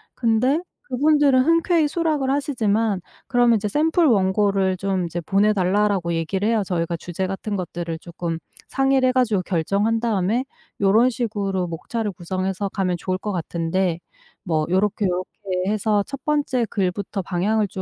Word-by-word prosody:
근데 250 +5 +2 0.2
그분들은 285 0 +3
흔쾌히 330 -1 +3
수락을 305 -4 0
하시지만 225 -7 +1 0.3
그러면 245 -2 +4
이제 210 0 -1
"샘플 320 - +2
원고를 195 -3 +2
좀 190 -1 -1
이제 170 +1 -4
보내 200 +5 +2
달라."라고 195 -2 +1
얘기를 190 +6 -1
해요. 225 -3 +2
저희가 170 -2 -1
주제 175 +3 -4
같은 195 +2 -4
것들을 170 -2 -4
쪼끔 170 -1 -5 0.3
상의를 270 -1 +2
해 - - +3
가지고 235 -7 +2
결정한 200 +6 0
다음에 225 +1 +1 0.4
요런 220 +6 +5
식으로 200 -7 -2
목차를 210 +6 -3
구성해서 185 +3 -3
가면 185 -2 -1
좋을 185 0 -2
것 210 +2 -4
같은데 170 0 -1 0.4
뭐 160 -5 0
요렇게 200 +3 +1
요렇게 180 0 -3 0.4
해서 210 -1 +1
첫 275 -1 -7
번째 290 -5 +1
글부터 195 +1 -2
방향을 200 +4 0
205 Hz, 345 characters per minute, -22 LUFS, 185-240 Hz, 0.4 s, 요런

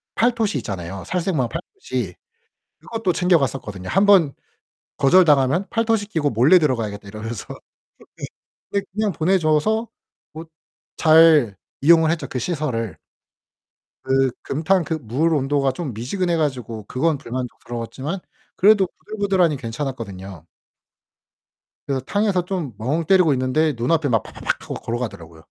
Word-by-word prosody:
팔토시 230 -2 +1
있잖아요, 95 -1 -6
살색마 170 -7 -1
팔토시. 180 - -5 0.6
그것도 225 -5 -2
챙겨갔었거든요. 135 - 0
한번 195 -6 +4 0.6
거절 180 +7 +5
당하면 150 +5 +3
'팔토시 225 -2 +1
끼고 150 -6 0
몰래 130 +11 +5
들어가야겠다.' 110 -9 -2
이러면서 110 +1 -6
어 - - -12 1.2
네. 200 - +1
근데 - - -18
그냥 215 -1 0
보내 180 +5 +2
줘서 180 +9 +1 0.5
뭐 160 +1 -8 0.5
잘 155 - +6 0.3
이용을 160 +1 +5
했죠, 170 - -3
그 125 - -4
시설을. 130 - -3 1.1
그 135 0 +2
금탕 165 +5 +1
그 160 - -2
물 145 +9 0
온도가 135 -1 +1
좀 135 -3 -5
미지근해 170 - -1
가지고 125 -8 -3
그건 150 +3 0
불만족스러웠지만 125 +4 -5 0.4
그래도 200 -1 +5 0.2
부들부들하니 195 -7 +1
괜찮았거든요. 110 - -6 1.4
그래서 135 -2 -1
탕에서 205 -4 +1
좀 175 -10 -4
멍 150 +9 -1
때리고 180 -4 +4
있는데 135 +5 +1
눈앞에 145 +4 +1
막 115 -2 +2
파파팍 - - -4
하고 - - -6
걸어가더라고요. 100 -9 -6
150 Hz, 325 characters per minute, -21 LUFS, 120-180 Hz, 1.4 s, 잘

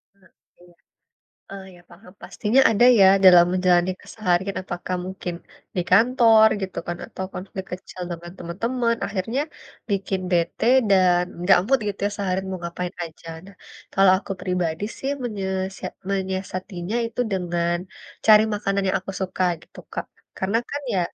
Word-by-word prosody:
Ah, - - -33
iya. 185 - -23 1.2
Oh, 195 -1 -8
iya, 175 -1 -16
paham, 180 +2 -16
pastinya 235 +5 +1
ada 225 +2 +3 0.2
ya 190 - +8 0.2
dalam 175 -2 +8
menjalani 180 0 +3
keseharian, 190 -2 -1
apakah 180 0 -4
mungkin 185 -2 -5 0.4
di 180 - +1
kantor 225 +1 +6
gitu 190 - -4
kan, 175 - -3
atau 190 - -6
konflik 190 +1 -6
kecil 180 0 -7
dengan 175 +1 -7
teman-teman. 230 +7 -1
Akhirnya, 215 +7 -2 0.5
bikin 195 -1 -1
bete 170 +5 0 0.2
dan 180 -2 +4 0.2
enggak 190 0 +5
mood 270 +1 +3
gitu 200 - -5
ya - - -1
seharian 190 -1 -2
mau 185 - -4
ngapain 175 +1 -5
aja. 165 0 -12 0.2
Nah 200 - -14 0.4
kalau 195 -1 +6
aku 195 - -6
pribadi 180 -1 -2
sih 270 - -3
menyesiat 190 -4 -4 0.2
menyiasatinya 190 0 -3
itu 230 - -5
dengan 175 -2 0 0.5
cari 215 -1 +8
makanan 200 -1 -1
yang - - +2
aku 195 +1 -7
suka, 185 0 -1 0.2
gitu - - -19
Kak. - - -4 0.3
Karena 200 +4 +1
kan 285 0 -4
ya, 185 - +2
190 Hz, 150 wpm, -23 LUFS, 180-200 Hz, 1.2 s, ya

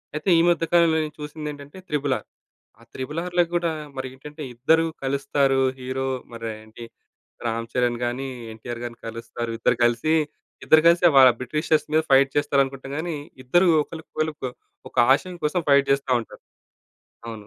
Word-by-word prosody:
అయితే 150 +5 -2
ఈ - - +5
మధ్య 170 -1 +2
కాలంలో 170 -2 +5
నేను 150 0 -7
చూసిందేంటంటే 150 0 -7
'త్రిబుల్ 145 -3 0
ఆర్.' - - -20 0.5
ఆ - - -18
'త్రిబుల్ 150 +5 -4
ఆర్‌'లో 175 -1 +2
కూడా 170 -1 0 0.3
మరేంటంటే 130 +4 -7
ఇద్దరు 160 +7 +3 0.2
కలుస్తారు. 135 0 +1 0.2
హీరో 130 +1 -3 0.3
మరి 115 -1 -6
ఏంటి 110 +2 -12 0.6
రామ్ 115 0 -2
చరణ్ 120 -1 +1
గాని, 130 +3 -3 0.2
ఎన్‌టి‌ఆర్ 115 +2 -7
గారిని 120 -1 -8
కలుస్తారు. 115 +1 -6
ఇద్దరు 120 - +2
కలిసి, 120 +7 +2 0.5
ఇద్దరు 155 0 +6
కలిసే 170 +1 +5
వాళ్ళ 130 -1 +9
బ్రిటిషర్స్ 155 +4 0
మీద 155 - +4
ఫైట్ 135 0 +6
చేస్తారనుకుంటాం 135 -1 0
గాని, 165 0 -3 0.3
ఇద్దరు 175 +9 +3 0.2
ఒకళ్ళకి 160 +1 -11 0.4
క - - -2 0.4
ఒక - - -27 0.2
ఆశయం 180 +5 -4
కోసం 155 +4 +1
ఫైట్ 140 0 +4
జేస్తా 140 -1 +1
ఉంటారు. 115 - -12 0.9
అవును. 110 -3 -8
140 Hz, 150 wpm, -24 LUFS, 125-155 Hz, 0.9 s, వాళ్ళ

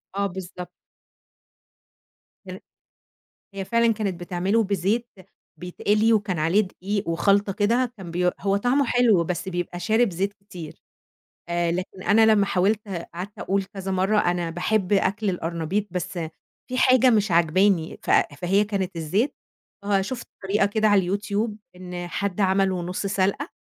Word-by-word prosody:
آه، 200 0 +1
بالضبط. 180 -1 -8 1.8
الر - - -7 1.0
هي 195 -1 -4
فعلًا 235 +2 +3
كانت 200 -5 -3
بتعمله 185 +5 0
بزيت 200 +5 0 0.5
بيتقلي 210 +5 +1
وكان 205 -5 0
عليه 165 +7 +3
دقيق 200 0 -3
وخلْطة 195 +4 +2
كده، 235 +5 +1
كان 185 -4 -9
بي 180 +1 +1
هو 195 0 +1
طَعمه 250 +6 +2
حلو، 235 -7 +3
بس 180 +2 -3
بيبقى 175 -1 -4
شارب 220 +3 +2
زيت 190 +3 -2
كتير، 190 -6 -11 0.7
آآ، 170 0 0
لكن 185 +1 -5
أنا 220 +2 +5
لمّا 215 -2 +4
حاولت، 205 +3 +1 0.3
قعَدت 185 +4 -7
أقول 195 +1 0
كذا 195 0 -6
مرّة 190 +3 +1
أنا 175 -3 +1
باحب 180 +4 0
أكْل 200 +1 +1
القرنبيط 175 +3 -2
بس 180 0 -3 0.6
في 255 - -3
حاجة 255 -1 +5
مش 210 -4 +2
عاجباني، 170 +1 +2
ف - - -6 0.3
فهي 195 +4 +3
كانت 195 -3 -3
الزيت، 185 - 0 0.5
آه، 200 -1 +2
شُفت 235 +4 -5 0.2
طريقة 195 +1 +2
كده 215 +1 +1
على 195 -2 +3
الYouTube 210 +2 -2 0.2
إن 180 -1 -6
حد 200 +2 -2
عمله 190 -1 +2
نُص 180 +3 -4
سَلقة، 200 - 0
195 Hz, 145 wpm, -24 LUFS, 180-210 Hz, 1.8 s, أنا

